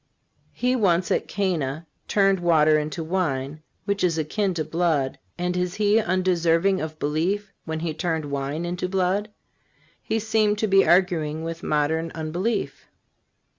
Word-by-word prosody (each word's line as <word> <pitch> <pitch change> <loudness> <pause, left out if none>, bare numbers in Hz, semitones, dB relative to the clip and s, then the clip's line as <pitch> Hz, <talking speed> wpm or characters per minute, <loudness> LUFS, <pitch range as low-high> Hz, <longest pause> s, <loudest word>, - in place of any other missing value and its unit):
He 250 +1 0
once 185 -6 +2
at - - +1
Cana 170 -6 -2 0.2
turned 195 -2 +3
water 155 -3 +4
into 150 +2 -4
wine, 155 -4 -2 0.2
which 200 -1 -1
is 170 -3 +2
akin 185 +5 -1
to 160 - -1
blood; 155 -4 0 0.2
and 180 0 -1
is 180 0 -1
He 210 +1 +3
undeserving 185 -1 +2
of 155 0 -5
belief 175 +8 -1
when 160 -1 -4
He 165 -2 -2
turned 160 -1 -2
wine 140 +4 -2
into 180 +1 -3
blood?" 190 +2 0 0.7
He 225 - -1
seems 215 -1 +1
to 220 - +2
be 195 -1 +4
arguing 165 -4 +2
with 165 0 -5
modern 160 +2 0
unbelief. 170 +8 -3
175 Hz, 145 wpm, -24 LUFS, 155-195 Hz, 0.7 s, water